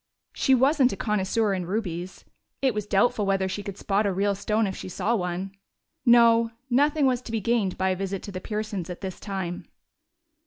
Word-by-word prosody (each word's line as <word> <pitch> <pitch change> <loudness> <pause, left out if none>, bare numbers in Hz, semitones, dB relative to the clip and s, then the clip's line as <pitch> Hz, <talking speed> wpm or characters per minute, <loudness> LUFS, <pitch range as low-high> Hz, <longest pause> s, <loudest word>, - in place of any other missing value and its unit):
She 265 - +3
wasn't 265 0 +4
a 195 - -5
connoisseur 210 +1 0
in 180 -2 -3
rubies; 185 -3 -4 0.3
it 265 -3 +2
was 210 -1 -3
doubtful 215 +3 +2
whether 195 -1 +1
she 190 +2 -4
could 200 -1 -7
spot 205 +1 +1
a - - +1
real 200 +2 +1
stone 210 +2 0
if 190 -2 -3
she - - -7
saw 225 +6 0
one. 180 0 -3 0.6
No, 230 -1 +6 0.2
nothing 290 +3 +3
was 255 -2 +2
to 240 - -9
be 225 - 0
gained 215 -3 0
by 190 0 +1
a 185 - +1
visit 195 0 -4
to 200 - -7
the 185 -1 -6
Pearsons' 210 -4 -4
at 180 - -7
this 190 -2 -6
time. 190 -4 -5
205 Hz, 200 wpm, -26 LUFS, 190-230 Hz, 0.6 s, No